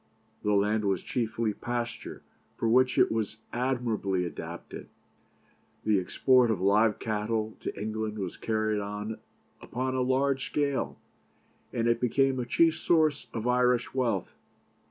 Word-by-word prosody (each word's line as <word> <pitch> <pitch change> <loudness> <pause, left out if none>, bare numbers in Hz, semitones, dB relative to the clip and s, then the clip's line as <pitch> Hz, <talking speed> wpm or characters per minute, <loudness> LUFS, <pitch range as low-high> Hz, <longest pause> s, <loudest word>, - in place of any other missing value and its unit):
The 105 -1 +1
land 105 +2 +2
was 95 -3 0
chiefly 115 -2 -1
pasture, 120 +2 -4 0.3
for 115 - 0
which 130 +2 +4
it - - +5
was 110 -1 -2 0.2
admirably 115 -7 0
adapted; 85 - -7 1.0
the 105 -2 +4
export 125 +6 +3
of 110 -5 +1
live 105 +3 +3
cattle 110 0 -2
to - - -5
England 110 0 -3
was 95 -4 -4
carried 110 -1 0
on 105 +2 -5 0.4
upon 130 +2 -3
a 130 - 0
large 130 +1 +1
scale, 140 -2 -1 0.7
and 115 0 0
it 115 0 +2
became 130 +2 +2
a 120 - -3
chief 160 +7 +3
source 155 -4 +2
of 115 0 -4
Irish 125 -1 +2
wealth. 120 -8 -1
115 Hz, 135 wpm, -29 LUFS, 105-130 Hz, 1.0 s, it